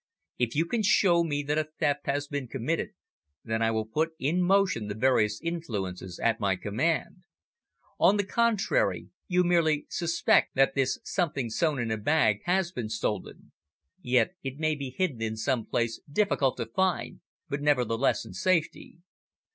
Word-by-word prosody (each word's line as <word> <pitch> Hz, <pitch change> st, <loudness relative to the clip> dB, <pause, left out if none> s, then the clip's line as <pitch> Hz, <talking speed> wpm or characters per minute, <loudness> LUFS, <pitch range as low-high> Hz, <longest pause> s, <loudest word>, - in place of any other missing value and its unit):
"If 120 Hz, 0 st, 0 dB
you 160 Hz, +3 st, +2 dB
can 225 Hz, +6 st, -1 dB
show 180 Hz, -4 st, +4 dB
me 145 Hz, -3 st, -2 dB
that 150 Hz, +2 st, 0 dB
a 155 Hz, 0 st, -3 dB
theft 145 Hz, -3 st, 0 dB
has 145 Hz, +1 st, -1 dB
been 145 Hz, -3 st, -4 dB
committed, 135 Hz, +7 st, -2 dB, 0.5 s
then 110 Hz, -1 st, -2 dB
I 115 Hz, -, +3 dB
will 110 Hz, -1 st, -1 dB
put 160 Hz, +8 st, -1 dB
in 160 Hz, +7 st, 0 dB
motion 185 Hz, -, +2 dB
the 100 Hz, -, -4 dB
various 110 Hz, -3 st, +2 dB
influences 100 Hz, -, -4 dB
at 115 Hz, -1 st, +1 dB
my 100 Hz, -3 st, +1 dB
command. 120 Hz, -, -1 dB, 0.8 s
On 205 Hz, -, +5 dB
the 205 Hz, -, +1 dB
contrary, 235 Hz, -, +1 dB, 0.2 s
you 180 Hz, -1 st, +2 dB
merely 165 Hz, -4 st, +2 dB
suspect 170 Hz, -1 st, +2 dB
that 135 Hz, 0 st, +3 dB
this 135 Hz, -1 st, 0 dB
something 145 Hz, -, -2 dB
sewn 155 Hz, +4 st, +1 dB
in 120 Hz, -3 st, -2 dB
a 110 Hz, -, 0 dB
bag 110 Hz, -3 st, +2 dB
has 180 Hz, 0 st, +1 dB
been 120 Hz, -9 st, -5 dB
stolen. 110 Hz, -1 st, -4 dB, 0.5 s
Yet 125 Hz, +8 st, +2 dB
it 135 Hz, 0 st, -5 dB
may 155 Hz, 0 st, +1 dB
be 140 Hz, -3 st, -5 dB
hidden 135 Hz, -3 st, -2 dB
in 110 Hz, 0 st, -2 dB
some 120 Hz, 0 st, -1 dB
place 115 Hz, -1 st, -1 dB
difficult 145 Hz, -8 st, +1 dB
to 115 Hz, -, -2 dB
find, 185 Hz, +11 st, -1 dB, 0.3 s
but 140 Hz, -1 st, -3 dB
nevertheless 130 Hz, -4 st, +1 dB
in -, -, -10 dB
safety. 175 Hz, -3 st, -1 dB
145 Hz, 165 wpm, -28 LUFS, 115-170 Hz, 0.8 s, On